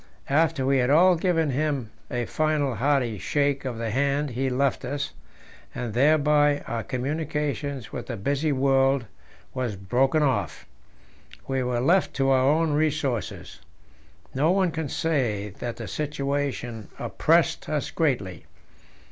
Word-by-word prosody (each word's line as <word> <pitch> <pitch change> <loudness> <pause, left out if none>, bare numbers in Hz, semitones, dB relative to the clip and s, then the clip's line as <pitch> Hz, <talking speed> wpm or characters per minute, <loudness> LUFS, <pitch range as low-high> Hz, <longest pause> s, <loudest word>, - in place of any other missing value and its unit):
After 155 -2 +2
we 135 0 +3
had 125 0 +2
all 175 +5 +6
given 165 -3 +1
him 135 -4 -1 0.2
a 120 -1 -2
final 155 -2 0
hearty 125 -3 0
shake 140 +2 0
of 125 -3 -3
the 115 -1 -3
hand 140 +3 0
he 130 +3 -1
left 130 +1 0
us, 140 - -3 0.6
and 120 -3 -4
thereby 145 +2 +3
our 115 -1 -2
communication 145 +1 -3
with - - -6
the 120 - -4
busy 140 +8 0
world 135 -1 +2 0.5
was 125 -5 -2
broken 130 +10 +1
off. 105 - -1 0.8
We 135 -1 0
were 125 -1 -1
left 175 +8 +2
to 135 0 +2
our 130 -1 +4
own 160 +1 +2
resources. 145 -8 -2 0.7
No 145 +5 +2
one 185 -1 +2
can 160 -3 -3
say 120 -12 -1
that 120 -1 -4
the 115 - -6
situation 140 -5 -3
oppressed - - +1
us - - -2
greatly. - - -1
140 Hz, 140 wpm, -25 LUFS, 125-150 Hz, 0.8 s, all